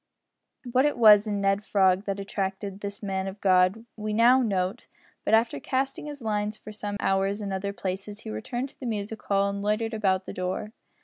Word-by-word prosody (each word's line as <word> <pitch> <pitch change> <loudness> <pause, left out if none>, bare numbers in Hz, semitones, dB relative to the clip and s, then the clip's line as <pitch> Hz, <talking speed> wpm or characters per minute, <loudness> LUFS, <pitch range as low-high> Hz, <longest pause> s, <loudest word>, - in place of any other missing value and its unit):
What 260 +3 +4
it 295 - +1
was 215 -2 +7
in 205 -1 -1
Ned 195 +1 +1
Frog 190 -1 +3
that 200 0 -2
attracted 195 0 -3
this 200 +1 -6
man 190 -1 -2
of 195 +1 -7
God 185 +3 +3
we 215 -1 -3
know 240 +4 +5
note 195 -1 -1 0.4
but, - - +4
after 225 +1 +1
casting 270 +2 -2
his 290 -4 -8
lines 210 -1 -1
for 215 - -10
some 205 -1 -4
hours 195 +1 +1
in 200 -2 -4
other 195 +1 -2
places, 200 +2 -5
he - - -7
returned 240 - -4
to - - -23
the 255 - -5
music 215 -1 -4
hall 200 0 +1
and 200 0 -3
loitered 215 +2 0
about 190 -3 +1
the - - -6
door. 185 +4 -3
205 Hz, 200 wpm, -27 LUFS, 195-220 Hz, 0.4 s, was